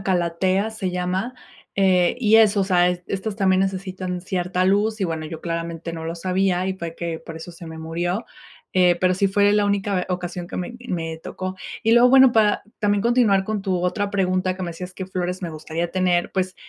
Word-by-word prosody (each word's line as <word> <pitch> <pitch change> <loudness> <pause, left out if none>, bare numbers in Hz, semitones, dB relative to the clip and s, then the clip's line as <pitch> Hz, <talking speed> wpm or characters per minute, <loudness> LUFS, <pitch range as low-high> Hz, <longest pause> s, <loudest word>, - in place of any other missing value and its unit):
una - - -8
calathea, 185 +3 +1
se 195 -4 -3
llama, 185 +7 -2 0.4
eh, 185 -2 +3
y 220 -1 +5
eso, 210 -2 +5
o - - +2
sea, 180 -2 +3
est 180 0 -2
estas 200 +2 -2
también 190 -2 +2
necesitan 185 -1 -3
cierta 180 0 -1
luz 205 +3 +2
y - - +2
bueno, 160 -2 -3
yo, 160 +1 -7
claramente, 170 0 -4
no 165 -1 -6
lo 165 +1 -3
sabía 185 +1 0
y 190 - -1
fue 170 -3 -6
que 170 -1 -4
por 165 0 -9
eso 165 +2 -8
se 170 0 -11
me 160 0 -8
murió. 175 +6 -2 0.5
Eh, 180 -1 +4
pero 185 0 +3
sí 195 +2 +2
fue 205 +1 +3
la 205 -1 +3
única 200 -2 0
ocasión 180 -1 -4
que - - -7
me 185 +7 -4
me 165 -2 -3
tocó. 185 +3 -6 0.3
Y, 225 - +3
luego 240 +1 +7
bueno, 265 -1 +7
para 215 -2 +3 0.2
también 205 -1 +1
continuar 230 -5 +3
con 215 0 -2
tu 190 -2 -1
otra 200 +3 0
pregunta 185 -2 0
que 185 - -6
me 175 - -3
decías 180 +2 -8
que 190 - -5
flores 185 0 -3
me 170 - -3
gustaría 160 +2 -4
tener. 180 -2 +1
Pues, 185 0 -1
185 Hz, 215 wpm, -22 LUFS, 175-200 Hz, 0.5 s, luego